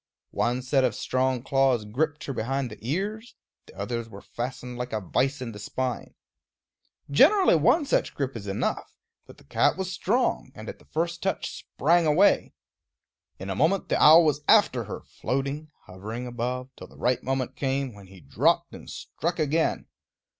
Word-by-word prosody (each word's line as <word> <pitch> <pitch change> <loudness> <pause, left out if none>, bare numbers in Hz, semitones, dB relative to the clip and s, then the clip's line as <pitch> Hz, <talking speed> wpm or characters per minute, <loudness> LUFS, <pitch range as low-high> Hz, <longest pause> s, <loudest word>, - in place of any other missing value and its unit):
One 125 +2 0
set 130 +1 +2
of - - +1
strong 130 -1 0
claws 135 -5 +2
gripped 145 +8 -2
her 140 - -4
behind 130 +1 -2
the 105 - -10
ears; 200 - -3 0.3
the - - -16
others 115 +3 -4
were 100 -2 -11
fastened 125 0 -6
like 125 -1 -4
a 110 - 0
vise 130 - -1
in 115 - -5
the 105 - -10
spine. 125 +4 -4 1.0
Generally 370 - +6
one 290 - +3
such - - 0
grip 135 -2 -3
is 105 -3 -7
enough; 100 +1 -2 0.3
but - - -14
the - - -19
cat 70 - +1
was 190 -1 -3
strong, 225 +7 0
and - - -9
at - - -7
the - - -21
first 170 +2 -2
touch 195 - -2
sprang 170 +3 +2
away. 175 +7 +4 0.9
In 95 +1 -6
a - - -2
moment 165 - +1
the - - +1
owl 160 +2 +8
was 150 -1 +1
after - - +4
her, - - -6
floating, 140 +4 -3 0.2
hovering 105 +6 -7
above, 125 +2 -4
till - - -11
the - - -18
right 125 0 +1
moment 130 -1 -2
came, 135 -2 -1
when 100 -2 -14
he 95 -1 -15
dropped 70 -2 +1
and - - -11
struck 170 +2 -4
again. 155 +1 0
130 Hz, 175 wpm, -26 LUFS, 120-155 Hz, 1.0 s, owl